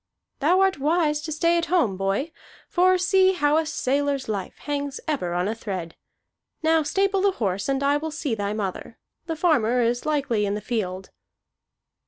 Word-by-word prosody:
"Thou 350 Hz, +7 st, +3 dB
art 385 Hz, -5 st, +2 dB
wise 300 Hz, 0 st, +1 dB
to 315 Hz, -, -6 dB
stay 335 Hz, +2 st, +2 dB
at 335 Hz, -, -3 dB
home, 325 Hz, -, +2 dB
boy; 195 Hz, -, -1 dB, 0.4 s
for 370 Hz, +1 st, +3 dB
see 375 Hz, +1 st, +3 dB
how 295 Hz, -4 st, +2 dB
a 320 Hz, -1 st, 0 dB
sailor's 280 Hz, 0 st, -1 dB
life 200 Hz, -4 st, -4 dB
hangs 285 Hz, -1 st, -4 dB
ever 180 Hz, -, -1 dB
on 180 Hz, +2 st, 0 dB
a 215 Hz, -, -1 dB
thread. 190 Hz, -7 st, -6 dB, 0.7 s
Now 320 Hz, 0 st, +4 dB
stable 390 Hz, +5 st, +1 dB
the 395 Hz, 0 st, +3 dB
horse, 200 Hz, -, -2 dB
and 270 Hz, 0 st, 0 dB
I 285 Hz, +1 st, +3 dB
will 315 Hz, +2 st, -4 dB
see 295 Hz, -4 st, -3 dB
thy 205 Hz, -2 st, -2 dB
mother. 210 Hz, +1 st, -5 dB, 0.3 s
The 325 Hz, -, -2 dB
farmer 270 Hz, -8 st, +2 dB
is 240 Hz, +1 st, 0 dB
likely 270 Hz, -8 st, 0 dB
in 200 Hz, -, -1 dB
the -, -, -3 dB
field." 190 Hz, -4 st, -4 dB
285 Hz, 180 wpm, -24 LUFS, 215-325 Hz, 0.7 s, Now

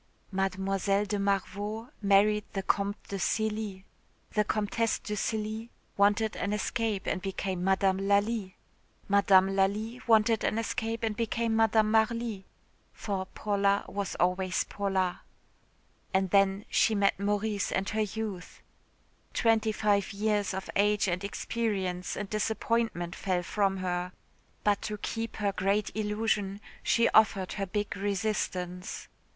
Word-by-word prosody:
Mlle. 195 Hz, 0 st, +1 dB, 0.6 s
de 205 Hz, 0 st, -2 dB
Marveau 205 Hz, +3 st, -2 dB
married 205 Hz, +1 st, +4 dB
the 195 Hz, -2 st, -2 dB
Comte 200 Hz, +1 st, 0 dB
de 200 Hz, -, -3 dB
Cély. 215 Hz, -1 st, -1 dB, 0.5 s
The 210 Hz, -, +2 dB
Comtesse 215 Hz, +2 st, 0 dB
de 210 Hz, -, -6 dB
Cély 220 Hz, +2 st, -2 dB, 0.3 s
wanted 205 Hz, +2 st, +3 dB
an 200 Hz, +3 st, -1 dB
escape 210 Hz, -1 st, -1 dB
and 185 Hz, -, -1 dB
became 190 Hz, -1 st, -3 dB
Madame 190 Hz, 0 st, +2 dB
Lalli. 200 Hz, -1 st, +1 dB, 0.5 s
Madame 195 Hz, -1 st, +5 dB
Lalli 210 Hz, +5 st, 0 dB
wanted 225 Hz, 0 st, +4 dB
an 215 Hz, -, 0 dB
escape 225 Hz, 0 st, -2 dB
and 220 Hz, -2 st, 0 dB
became 230 Hz, 0 st, 0 dB
Madame 220 Hz, -1 st, +3 dB
Marly 220 Hz, -2 st, +1 dB, 0.4 s
for 190 Hz, -3 st, -4 dB
Paula 200 Hz, -1 st, +1 dB
was 200 Hz, -1 st, -3 dB
always 180 Hz, +1 st, +1 dB
Paula. 190 Hz, -3 st, -1 dB, 0.9 s
And 190 Hz, -1 st, +2 dB
then 195 Hz, 0 st, +3 dB
she 220 Hz, -, +3 dB
met 200 Hz, -1 st, +2 dB
Maurice 205 Hz, 0 st, 0 dB
and 195 Hz, +1 st, 0 dB
her 220 Hz, 0 st, 0 dB
youth. 210 Hz, -3 st, -5 dB, 0.7 s
Twenty 225 Hz, -1 st, +3 dB
five 205 Hz, -1 st, +1 dB
years 205 Hz, -1 st, 0 dB
of 190 Hz, -, -5 dB
age 210 Hz, +1 st, +3 dB
and 180 Hz, +1 st, -1 dB
experience 200 Hz, -4 st, -2 dB
and 205 Hz, -, -3 dB
disappointment 215 Hz, -3 st, -1 dB
fell 185 Hz, -2 st, -1 dB
from 195 Hz, +1 st, 0 dB
her. 180 Hz, -1 st, -2 dB, 0.5 s
But 205 Hz, -1 st, +2 dB
to 210 Hz, -, -4 dB
keep 225 Hz, +2 st, -4 dB
her 205 Hz, -2 st, 0 dB
great 200 Hz, +2 st, 0 dB
illusion 210 Hz, -2 st, -1 dB, 0.2 s
she 235 Hz, 0 st, +3 dB
offered 200 Hz, -4 st, +3 dB
her 195 Hz, -1 st, -3 dB
big 205 Hz, +2 st, -2 dB
resistance.... 195 Hz, -3 st, -2 dB
205 Hz, 130 wpm, -29 LUFS, 195-220 Hz, 0.9 s, Madame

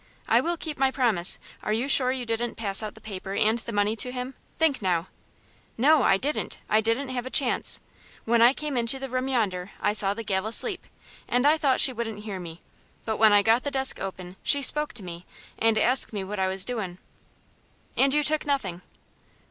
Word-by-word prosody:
"I -, -, +4 dB
will 340 Hz, +1 st, -2 dB
keep 310 Hz, -3 st, -6 dB
my 270 Hz, -1 st, +3 dB
promise. 230 Hz, -10 st, +1 dB, 0.2 s
Are -, -, -3 dB
you 235 Hz, +5 st, -1 dB
sure 260 Hz, -2 st, +4 dB
you 255 Hz, -2 st, -4 dB
didn't 230 Hz, +1 st, -3 dB
pass 200 Hz, -3 st, -1 dB
out 215 Hz, -1 st, -6 dB
the 220 Hz, -, -15 dB
paper 195 Hz, -2 st, -7 dB
and 220 Hz, +3 st, +2 dB
the 235 Hz, -, -7 dB
money 205 Hz, 0 st, 0 dB
to 250 Hz, +3 st, +2 dB
him? 250 Hz, +1 st, -5 dB, 0.2 s
Think 310 Hz, -6 st, +1 dB
now." 180 Hz, -2 st, -1 dB, 0.7 s
"No, 295 Hz, +6 st, +4 dB
I 195 Hz, -, +3 dB
didn't. 290 Hz, +9 st, -3 dB
I 215 Hz, +1 st, +3 dB
didn't 230 Hz, +5 st, -1 dB
have 255 Hz, -1 st, -4 dB
a -, -, -5 dB
chance. 260 Hz, -2 st, +1 dB, 0.5 s
When 235 Hz, 0 st, +2 dB
I 240 Hz, +2 st, +7 dB
came 290 Hz, -1 st, -4 dB
into 235 Hz, +2 st, 0 dB
the 270 Hz, -1 st, -7 dB
room 255 Hz, +1 st, -2 dB
yonder 200 Hz, -8 st, -1 dB
I 205 Hz, -, 0 dB
saw 200 Hz, -1 st, +2 dB
the 230 Hz, -, -6 dB
gal 190 Hz, 0 st, -2 dB
asleep, 365 Hz, -, +2 dB, 0.4 s
and 245 Hz, +2 st, +1 dB
I 300 Hz, +2 st, +5 dB
thought 280 Hz, -4 st, +1 dB
she 260 Hz, -, +4 dB
wouldn't 225 Hz, -3 st, -5 dB
hear 200 Hz, -3 st, -5 dB
me, 170 Hz, -1 st, -10 dB, 0.4 s
but 220 Hz, -1 st, -2 dB
when 220 Hz, -1 st, +5 dB
I 205 Hz, 0 st, +5 dB
got 225 Hz, +3 st, +3 dB
the 285 Hz, -, -3 dB
desk 265 Hz, -1 st, +2 dB
open 185 Hz, -1 st, -7 dB
she 285 Hz, -1 st, +2 dB
spoke 300 Hz, +2 st, +3 dB
to 220 Hz, -, -7 dB
me, 175 Hz, -1 st, -8 dB, 0.4 s
and 225 Hz, -1 st, +2 dB
asked 250 Hz, +4 st, +3 dB
me 200 Hz, -2 st, -3 dB
what 200 Hz, +1 st, -6 dB
I 190 Hz, -, +1 dB
was 190 Hz, 0 st, +2 dB
doin'." 210 Hz, -8 st, -3 dB, 1.0 s
"And 270 Hz, 0 st, +3 dB
you 300 Hz, +1 st, +2 dB
took 305 Hz, +1 st, +2 dB
nothing?" 205 Hz, -, -2 dB
230 Hz, 215 wpm, -25 LUFS, 205-265 Hz, 1.0 s, I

